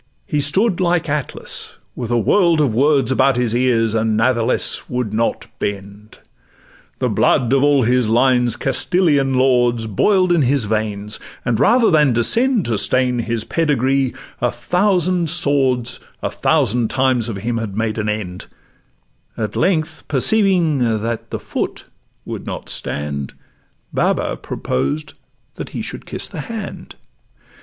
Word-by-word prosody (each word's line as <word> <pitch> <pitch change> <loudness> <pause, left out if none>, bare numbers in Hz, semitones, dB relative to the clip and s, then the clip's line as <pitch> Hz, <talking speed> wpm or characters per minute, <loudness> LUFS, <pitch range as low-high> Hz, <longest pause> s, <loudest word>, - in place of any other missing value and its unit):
He 150 - -1
stood 185 +8 +1
like 175 -2 +1
Atlas, 145 -2 -3 0.2
with 120 -3 -5
a 120 - +1
world 170 - +3
of 140 -7 +2
words 140 +2 +2
About 135 +1 +3
his 120 -2 0
ears, 120 -3 +2
and 110 -1 +1
nathless 115 +1 +1
would 125 -4 -3
not 115 +2 -1
bend: 100 +1 -6 0.8
The - - 0
blood 125 0 +2
of 135 - +3
all 145 -2 +4
his 125 -1 +2
line 125 +1 +3
's 115 - -2
Castilian 140 -1 +1
lords 120 -3 +2
Boil'd 185 - +2
in 170 -2 +3
his 135 0 +1
veins, 105 -1 -2 0.3
and 115 -2 0
rather 230 - +4
than 150 -5 +4
descend 230 - +3
To 115 -3 0
stain 125 +2 +1
his 115 -1 -2
pedigree 135 -3 0 0.3
a 120 - +2
thousand 180 - 0
swords 135 -7 +1 0.2
A - - -1
thousand 125 -7 +1
times 130 -3 +1
of 110 - -4
him 115 +3 -2
had 105 -3 -5
made 110 0 -1
an 105 -1 -1
end; 100 -4 -5 0.9
At 110 -2 -3
length 160 -4 0
perceiving 175 - +2
the 115 -1 -1 0.2
'foot' - - -4 0.4
could - - -6
not - - -6
stand, 70 -2 -4 0.6
Baba - - 0
proposed 70 +4 -3 0.4
that - - -6
he - - -3
should - - -7
kiss - - -5
the - - -6
hand. 220 +3 -7
125 Hz, 145 wpm, -18 LUFS, 115-150 Hz, 0.9 s, all